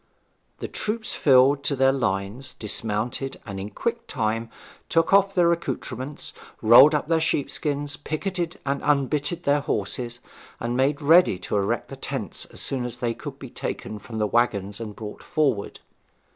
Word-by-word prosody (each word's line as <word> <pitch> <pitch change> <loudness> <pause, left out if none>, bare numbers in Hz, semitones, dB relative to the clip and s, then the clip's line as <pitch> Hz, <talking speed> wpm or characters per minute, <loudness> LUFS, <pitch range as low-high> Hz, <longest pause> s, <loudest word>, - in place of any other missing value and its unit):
The - - -3
troops 220 +1 -2
filed 135 +1 +4
to 140 - +2
their 135 0 +4
lines, 120 +1 -2
dismounted, 110 +5 -2
and 100 -3 -6
in 100 +2 -5
quick 235 - -3
time 115 +1 -1 0.4
took 165 +3 +2
off 195 0 +5
their 175 -2 +4
accoutrements, 140 -4 -4 0.3
rolled 130 +7 +8
up 150 - -1
their 165 -1 +2
sheep 150 -3 0
skins, 145 -1 -1
picketed 175 +3 -3
and 140 0 -1
unbitted 145 +3 +1
their 145 +1 +2
horses, 120 -3 -2 0.4
and 120 +1 -2
made 140 +3 +1
ready 165 - +6
to - - -2
erect 100 -1 0
the - - -7
tents - - -4
as - - -7
soon 130 -2 -1
as 120 -1 -5
they 120 -1 -1
could - - -8
be - - -10
taken 105 - -5
from 110 +1 -8
the 105 - +1
waggons 105 -3 0
and 110 -3 -6
brought 105 -2 -8
forward. 140 -10 -1
135 Hz, 165 wpm, -24 LUFS, 115-150 Hz, 0.4 s, rolled